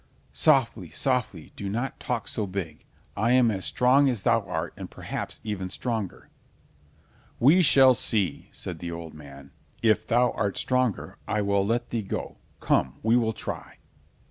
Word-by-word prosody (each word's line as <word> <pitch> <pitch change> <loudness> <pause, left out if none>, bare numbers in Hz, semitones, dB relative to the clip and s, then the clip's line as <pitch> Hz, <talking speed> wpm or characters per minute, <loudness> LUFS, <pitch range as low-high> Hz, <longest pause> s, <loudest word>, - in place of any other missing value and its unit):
"Softly, 115 -9 +2
softly, 125 - -1
do 100 - -5
not 120 +6 -3
talk 120 -3 -3
so 105 -2 -1
big. 90 -5 -6 0.3
I 115 +4 +2
am 125 -3 +4
as 95 -2 0
strong 135 +3 +4
as 120 -6 -1
thou 115 - +3
art, 85 -1 -3
and - - -8
perhaps - - -6
even 100 -4 -4
stronger." 110 -2 -4 1.1
"We 155 +10 +6
shall 135 -5 +6
see," 110 - -1
said 85 -3 -7
the 85 - -5
old 85 -1 -7
man. 70 -2 -13 0.3
"If 110 -2 +2
thou 120 0 +3
art 100 -3 -2
stronger, 125 -4 0
I 105 -1 0
will 100 0 +1
let 120 +4 -1
thee 115 - -1
go—come, 70 -8 -2
we 110 +2 +3
will 115 -2 +2
try." - - -6
110 Hz, 155 wpm, -26 LUFS, 95-125 Hz, 1.1 s, We